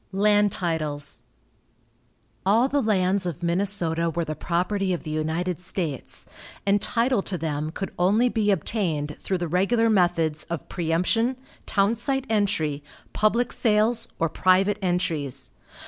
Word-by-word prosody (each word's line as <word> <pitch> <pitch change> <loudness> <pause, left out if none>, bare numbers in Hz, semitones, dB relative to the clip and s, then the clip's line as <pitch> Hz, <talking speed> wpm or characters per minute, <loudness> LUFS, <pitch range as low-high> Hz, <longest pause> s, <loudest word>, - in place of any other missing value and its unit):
LAND 205 +1 +3
TITLES. 155 -6 -3 1.2
All 220 +7 +4
the 285 +1 +1
lands 195 -3 +1
of 175 0 -5
Minnesota 170 -2 +1
were 165 +1 -2
the 155 - -3
property 185 +5 -1
of 175 - -4
the 155 - -5
United 160 +3 -1
States, 175 -6 -4 0.4
and 200 0 +3
title 240 -1 +1
to 190 -1 -4
them 155 -2 -2
could 195 +4 -5
only 205 +7 +4
be 220 -4 0
obtained 165 -6 -1
through 190 - -1
the 175 -1 -3
regular 220 +7 +2
methods 170 -5 +2
of 170 -4 -5
preëmption, 180 +9 +1 0.3
town 200 +1 +2
site 270 +3 -2
entry, 165 -9 0 0.3
public 230 +3 +2
sales, 225 +1 +2
or 165 - +1
private 185 +5 +2
entries. 170 -7 -1
185 Hz, 135 wpm, -25 LUFS, 165-210 Hz, 1.2 s, All